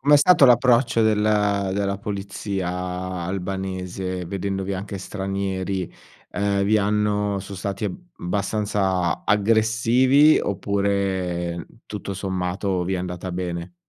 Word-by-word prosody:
Com'è 145 +1 +6
stato 145 -2 +6
l'approccio 120 -1 +4
del 110 -1 +3
della 100 -2 +1
polizia 100 -2 -4 0.6
albanese, 95 -1 -4
vedendovi 95 +1 -3
anche 100 +1 -5
stranieri? 95 -1 -3 0.4
Ehm, 100 0 0
vi 105 +2 +3
hanno 105 0 +1
so' 100 +1 -8
stati 100 +2 -4
eb 95 - -2 0.2
abbastanza 95 -1 -1
aggressivi? 115 +7 +4
Oppure, 95 -4 -1 0.2
tutto 100 - -6
sommato, 95 0 -2
vi 95 - -1
è - - 0
andata 90 0 -4
bene? 90 -1 -4
100 Hz, 110 wpm, -23 LUFS, 95-105 Hz, 0.6 s, Com'è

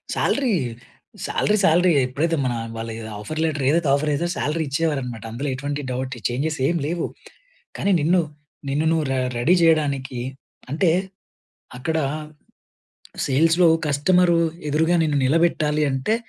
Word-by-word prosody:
Salary, 265 -6 +1 0.7
salary 210 0 +1
సాలరియే. 170 -2 +4
ఎప్పుడైతే 160 +5 -1
మన 125 - 0 0.2
వాళ్ళ 115 0 -5
ఎ - - -7 0.2
ఆఫర్ 155 +10 -4
లెటర్ 150 -4 -1
ఏదైతే 160 -1 +2
ఆఫర్ 150 +1 -1
ఏదో 170 +4 -1
సాలరీ 155 +4 -1
ఇచ్చేవారన్నమాట. 135 -7 -2
అందులో 135 +5 -3
ఎటువంటి 145 +2 -4
డౌట్, 130 +1 -3
ఛేంజెస్ 150 +6 -2
ఏం 170 - +1
లేవు. 170 +2 -2 0.7
కానీ 200 - +1
నిన్ను, 175 +4 +3 0.5
నిన్ను 150 +3 0
నువ్వు 160 -2 +1
రె 130 - 0 0.2
రెడీ 170 +10 +4
చేయడానికి, 140 -6 +1 0.5
అంటే 165 +3 +2 0.9
అక్కడ 160 +5 -2 1.3
సేల్స్‌లో, 165 +5 +4 0.2
కస్టమర్ 175 +5 +3 0.4
ఎదురుగా 160 +4 +2
నిన్ను 150 -2 +1
నిలబెట్టాలి 155 0 +2
అంటే, 135 +12 0
155 Hz, 130 wpm, -22 LUFS, 135-165 Hz, 1.3 s, సాలరియే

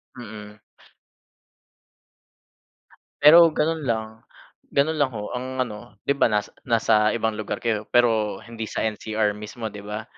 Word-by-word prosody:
Mm. 105 -3 -10 2.6
Pero 165 +3 +9
ganun 160 +1 -1
lang. 110 -4 -1 0.6
Ganun 150 +2 +1
lang, 140 -2 +3
ho, 105 0 -5
ang 130 +1 -2
ano 105 -3 -10
di - - 0
ba 140 - +3
nas 105 -2 -1 0.2
nasa 110 -2 +3
ibang 110 -2 -1
lugar 110 - -4
kayo 110 -2 -1
pero 110 -5 +2
hindi 115 0 -7
sa - - -3
NCR 110 -1 -1
mismo 105 +1 -7
di 105 - -9
ba? 105 +2 -6
110 Hz, 135 wpm, -24 LUFS, 105-130 Hz, 2.6 s, Pero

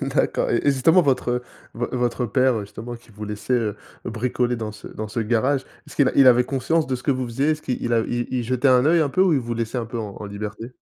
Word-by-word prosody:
D'accord - - 0
et - - +2
et 145 - +2
justement, 160 +7 +4
votre, 135 -5 +1
heu, 125 0 -1 0.3
v 120 +1 -2
votre 125 0 -1
père, 130 +3 +2
heu, 110 - -1
justement, 110 +4 -7
qui 120 0 -15
vous 105 0 -8
laissait, 105 +4 -4
heu, 110 -4 0 0.3
bricoler 125 +1 -1
dans 110 -2 -4
ce 105 - -12
dans 110 0 -6
ce 105 - -5
garage, 120 +5 +1 0.2
est-ce - - -13
qu'il 140 -3 +4
il 135 -2 +7
avait 125 0 +5
conscience 145 +5 0
de 130 - -1
ce 125 - -6
que - - +1
vous 130 -2 0
faisiez? 135 +6 0
Est-ce 155 0 -2
qu'il 120 -2 -2
a 115 - +4
il 110 - -4
il 120 0 -1
il 125 -2 -1
jetait 130 +3 +1
un 125 0 +5
œil 165 +2 +4
un 150 - +2
peu, 185 +7 +2
ou 190 -3 +4
il 140 - +2
vous 120 0 -4
laissait 115 +2 -3
un 115 - -3
peu 120 +1 -5
en 105 -3 -5
en - - -5
liberté? 105 +3 -6
125 Hz, 280 wpm, -23 LUFS, 115-135 Hz, 0.3 s, il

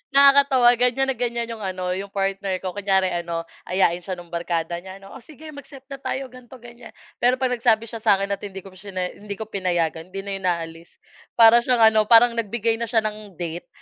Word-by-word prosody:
Nakakatawa 275 -3 +6
ganyan 260 +2 +2
na 260 - -5
ganyan 235 -1 -2
yung 225 - -7
ano, 185 -1 -3
yung 195 +2 -4
partner 195 -1 -2
ko. 185 - -3
Kunyari 190 -1 0
ano, 170 -1 -3 0.2
ayain 180 -2 +1
siya 185 +1 -6
no'ng 175 -1 -13
barkada 170 0 -3
niya 190 +1 -11
ano, 195 - -14
"Oh, - - -10
sige 310 +1 -12
mag-set 275 -2 -12
na 275 - -7
tayo 270 0 -4
ganito, 255 0 -14
ganyan." 240 0 -14 0.3
Pero 250 +1 +3
'pag 260 -1 -1
nagsabi 230 -2 +2
siya 230 - -7
sa'kin 200 -2 +1
at 200 - -2
hindi 195 -2 -8
ko 195 - -13
shiney 185 -1 -6
hindi 205 0 -7
ko 220 - -7
pinayagan, 175 -4 -2
hindi 195 - -4
na 200 - -6
yun 190 - -3
aalis. 165 -1 -4 0.4
Para 230 +1 +8
siyang 235 -3 +4
ano, 215 -1 +2
parang 235 0 +6
nagbigay 225 0 -1
na 235 - -2
siya 225 -2 +1
ng 210 -3 -6
date, 170 -1 -6
205 Hz, 215 wpm, -22 LUFS, 185-240 Hz, 0.4 s, Para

